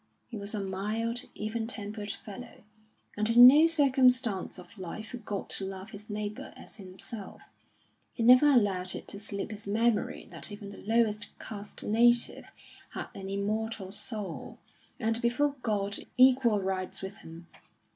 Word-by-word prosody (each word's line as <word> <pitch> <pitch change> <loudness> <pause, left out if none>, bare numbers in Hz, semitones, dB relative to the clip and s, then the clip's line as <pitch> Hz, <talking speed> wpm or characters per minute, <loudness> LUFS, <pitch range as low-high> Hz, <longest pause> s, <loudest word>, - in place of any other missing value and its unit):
He 235 - -7
was 205 +1 -4
a - - -2
mild, 215 +5 -2
even 220 +1 -3
tempered 210 -2 -4
fellow, 215 +5 -9 0.5
and 215 +1 +1
in 240 +1 +9
no 295 +6 +9
circumstance 255 - +2
of 185 +3 -13
life 205 +3 -7
forgot 215 -5 -5
to - - +1
love 190 +2 -6
his 210 0 -11
neighbour 210 0 -5
as - - -13
himself; 195 +2 -10 0.7
he 230 - -3
never 250 +5 +8
allowed 200 -9 +3
it - - -8
to 200 - -5
slip 205 0 -5
his 210 -1 -8
memory 225 +2 0
that - - -9
even 205 -1 -8
the - - -11
lowest 215 -1 +1
caste 205 -1 -7
native 235 +2 +3 0.5
had - - -5
an 195 0 -7
immortal 205 0 -2
soul, 210 -3 -5 0.4
and 225 +1 0
before 260 +4 +1
God 205 -3 -1 0.2
equal 255 -4 +5
rights 190 -1 -3
with 190 +1 -6
him. 165 -3 -12
215 Hz, 150 wpm, -30 LUFS, 200-235 Hz, 0.7 s, in